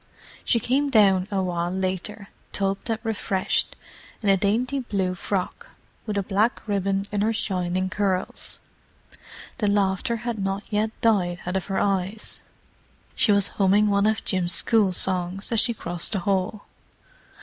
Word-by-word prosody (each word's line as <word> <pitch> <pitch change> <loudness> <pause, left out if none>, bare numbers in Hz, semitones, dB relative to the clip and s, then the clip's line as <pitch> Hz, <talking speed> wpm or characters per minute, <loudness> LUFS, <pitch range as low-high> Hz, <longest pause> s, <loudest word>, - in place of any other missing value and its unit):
She 235 - +2
came 275 +5 +1
down 195 -6 +4
a 195 -2 0
while 175 -1 -1
later, 190 +2 -3 0.2
tubbed 195 +3 -2
and 225 - +1
refreshed, 200 -4 -1 0.5
in 205 - +2
a 195 - +6
dainty 230 +8 0
blue 195 -7 -1
frock, 195 - -3 0.4
with 210 -1 -2
a 200 - +1
black 210 +5 +1
ribbon 195 -1 0
in 205 -1 0
her 220 +2 +2
shining 185 -4 -1
curls. 190 -1 -1 1.0
The 210 - +1
laughter 200 +3 +1
had 235 -3 -2
not 195 +1 -2
yet 215 +1 +1
died 180 -6 +2
out 180 +1 -3
of 190 - -2
her 195 -1 -2
eyes; 195 +1 -1 0.7
she 215 - +4
was 200 -1 +3
humming 205 +2 +4
one 200 +1 +3
of 220 -1 -1
Jim's 180 -2 +1
school 215 -4 +3
songs 185 +2 +1
as 230 - +3
she 240 - +2
crossed 175 -4 0
the 200 - +1
hall. 195 +2 -1
200 Hz, 155 wpm, -24 LUFS, 185-215 Hz, 1.0 s, a